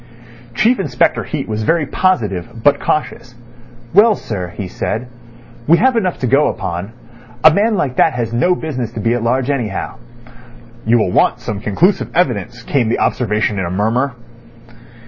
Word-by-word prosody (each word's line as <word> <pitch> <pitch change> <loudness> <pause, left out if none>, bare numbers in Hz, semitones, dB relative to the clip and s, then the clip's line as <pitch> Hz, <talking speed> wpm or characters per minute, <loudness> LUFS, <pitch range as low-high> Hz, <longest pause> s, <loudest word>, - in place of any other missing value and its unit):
Chief 230 - +3
Inspector 190 - +1
Heat 145 -4 -4
was 110 0 -3
very 165 +6 +1
positive, 115 - -1
but 145 - +4
cautious. 125 -4 -3 0.6
"Well, 210 +3 +6
sir," 95 - -5
he 100 - -4
said, 115 +6 -4 0.6
"we 170 +3 +6
have 260 +4 +3
enough 185 -6 0
to - - 0
go 140 +4 +3
upon. 95 0 -4 0.5
A 160 - +8
man 215 +4 +2
like 135 -9 -2
that - - +4
has 120 -2 -3
no 130 +10 +2
business 130 -9 -4
to - - -5
be 115 +2 +1
at 120 - -1
large, 125 +4 0
anyhow." 115 -9 -3 0.9
"You 120 +2 +4
will 110 -5 +1
want - - +2
some 105 - -5
conclusive 170 - +1
evidence," 120 - -1
came 125 -4 0
the 115 - +1
observation 105 -3 0
in 95 - -1
a - - -3
murmur. 115 +8 0
120 Hz, 165 wpm, -17 LUFS, 110-160 Hz, 0.9 s, A